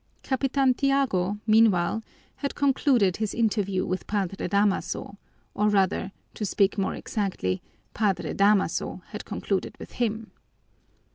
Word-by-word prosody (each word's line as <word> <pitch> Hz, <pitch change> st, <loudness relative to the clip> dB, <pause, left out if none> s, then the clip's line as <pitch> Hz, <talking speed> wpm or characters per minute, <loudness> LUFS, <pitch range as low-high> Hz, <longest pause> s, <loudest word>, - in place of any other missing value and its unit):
Capitan 270 Hz, 0 st, +2 dB
Tiago, 245 Hz, -8 st, +1 dB
meanwhile, 215 Hz, -3 st, +4 dB, 0.4 s
had 280 Hz, -, -3 dB
concluded 265 Hz, -, +2 dB
his 215 Hz, -2 st, -2 dB
interview 205 Hz, -4 st, 0 dB
with 185 Hz, +1 st, -3 dB
Padre 195 Hz, -3 st, -2 dB
Damaso, 200 Hz, +1 st, 0 dB, 0.3 s
or 210 Hz, +1 st, +2 dB
rather, 195 Hz, -1 st, +1 dB, 0.2 s
to -, -, -5 dB
speak 200 Hz, 0 st, +2 dB
more 195 Hz, -2 st, -1 dB
exactly, 185 Hz, -, -2 dB, 0.3 s
Padre 190 Hz, -6 st, 0 dB
Damaso 200 Hz, 0 st, +1 dB
had -, -, -7 dB
concluded -, -, -3 dB
with -, -, -10 dB
him. 225 Hz, -2 st, -2 dB
205 Hz, 120 wpm, -26 LUFS, 195-230 Hz, 0.4 s, meanwhile